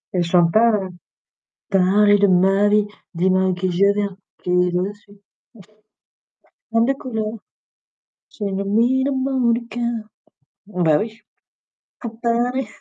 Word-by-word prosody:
Elle 180 - +2
chante 170 0 +3
pas, 230 +1 +5
heu, 195 -3 -1 0.8
parler 205 +2 +4
de 200 - +4
ma 195 +2 +3
vie, 210 0 +3 0.3
dis-moi 185 +2 +2
avec 185 -1 0
qui 185 0 -1
je 200 +3 +3
viens, 200 -2 -2 0.3
qui 180 - -2
est 180 0 +2
de 180 +1 0
la 205 - -5
suite. 205 0 -21 1.5
Femme 230 0 +3
de 270 - +1
couleur. 225 -6 -4 1.0
J'ai 205 -2 -5
le 195 0 -3
mine 240 +6 +2
au 280 - -1
mot 260 -2 +1
du 235 0 -2
cœur. 235 0 -3 0.6
Bah, 175 -7 +1
oui 225 +1 -6 0.8
pour 225 -1 -8
parler 245 +2 0
205 Hz, 150 wpm, -20 LUFS, 185-235 Hz, 1.5 s, pas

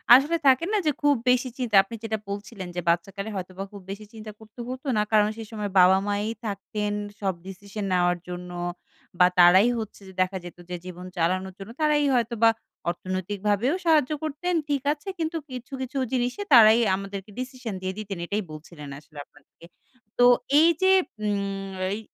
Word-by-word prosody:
আসলে 295 +6 +3
থাকে 265 +5 +5
না - - +4
যে - - +5
খুব 290 -1 +4
বেশি 250 +1 +3
চিন্তা। 240 -5 -1
আপনি 230 - -9
যেটা 220 -1 -1
বলছিলেন 200 -1 -6
যে 175 - -1
বাচ্চাকালে 195 +5 -1
হয়তোবা 185 +1 -5
খুব 200 - -9
বেশি 210 +2 -7
চিন্তা 215 -1 -8
করতে 220 +2 -17
হতো 260 +2 -6
না 210 - +3
কারণ 210 -1 +5
সেই 225 -2 -7
সময় 210 -2 -4
বাবা 185 +1 +7
মায়াই 205 +2 -1
থাকতেন 205 +1 -3 0.3
সব 195 -2 0
ডিসিশন 200 +2 -6
নেওয়ার 175 0 +2
জন্য 180 0 -6 0.7
বা 180 - +8
তারাই 185 +6 +7
হচ্ছে 215 -1 -7
যে 190 - -12
দেখা 185 +1 0
যেত 175 - -10
যে 180 - -3
জীবন 180 0 -8
চালানোর 185 +3 0
জন্য 195 +4 -8
তারাই 300 -1 +3
হয়তো 235 0 0
বা 225 - +8 0.4
অর্থনৈতিক 185 +3 -4
ভাবেও 235 - +2
সাহায্য 310 -4 +4
করতেন। 315 +4 -2 0.2
ঠিক 280 -2 0
আছে 305 +6 -9
কিন্তু 325 +1 -1
কিছু, 250 +2 -8
কিছু 260 +2 -4 0.2
জিনিসে 250 +9 -1
তারাই 225 -1 +8 0.2
আমাদেরকে 195 +1 -7
ডিসিশন 255 -4 -5
দিয়ে 185 0 -3
দিতেন 200 -3 -5
এটাই 205 +3 -2
বলছিলেন 155 -1 -10
আসলে 150 0 -19
আপনাদেরকে। 145 +3 -20 0.5
তো 245 - +7 0.3
এই 330 +2 +6
যে 380 0 +5 0.3
উম 200 -1 -2 0.2
এই - - -5
210 Hz, 180 wpm, -25 LUFS, 190-250 Hz, 0.7 s, বা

